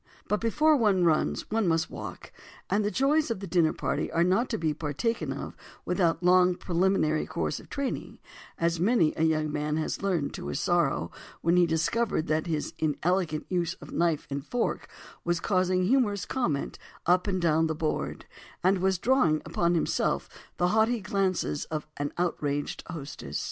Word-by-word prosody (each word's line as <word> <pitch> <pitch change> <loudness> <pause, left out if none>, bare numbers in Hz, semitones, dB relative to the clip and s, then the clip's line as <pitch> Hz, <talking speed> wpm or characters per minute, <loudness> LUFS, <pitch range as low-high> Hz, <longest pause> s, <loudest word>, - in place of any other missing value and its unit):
But 210 - 0
"before 300 +7 +3
one 205 -8 +3
runs, 160 -3 +2
one 220 -3 +1
must 165 0 +1
learn - - -7
to - - -5
walk"—and 210 +1 -5
the 205 - +1
joys 280 +6 +2
of 230 - -2
the 200 - -6
dinner 170 -3 +3
party - - -2
are 170 - +2
not 190 +8 +2
to - - -1
be 160 -2 0
partaken 155 - -2
of - - -6 0.3
without 175 -2 +1
a - - -1
long 180 0 +5
preliminary 175 -3 +1
course - - -2
of - - -15
training, 280 -2 -4 0.4
as 170 0 0
many 190 -4 +3
a - - -3
young 155 -1 +2
man 150 +1 -1
has 155 - -2
learned 180 -7 0
to - - -6
his 70 - -2
sorrow - - +1 0.3
when 170 +2 +3
he 175 -1 +5
discovered 165 +3 0
that 155 +2 0
his 155 -3 -2
inelegant 160 +1 0
use 175 -1 -1
of - - -12
knife 170 -3 +1
and 140 0 -3
fork 245 - -2 0.3
was 175 0 0
causing 185 -1 +1
humorous 210 -2 +2
comment 170 - -2 0.3
up 180 +3 +3
and 190 -2 0
down 160 -1 +3
the 160 - -2
"board" 155 0 -2 0.4
and 190 +1 +3
was 190 0 +2
drawing 180 - +3
upon 170 0 +1
himself 165 - 0 0.3
the 180 0 +2
haughty 220 +3 +2
glances 190 - -1
of 155 -1 -4
an 145 0 -2
outraged 145 -5 -2
hostess. 140 - -6
175 Hz, 180 wpm, -28 LUFS, 155-200 Hz, 0.4 s, long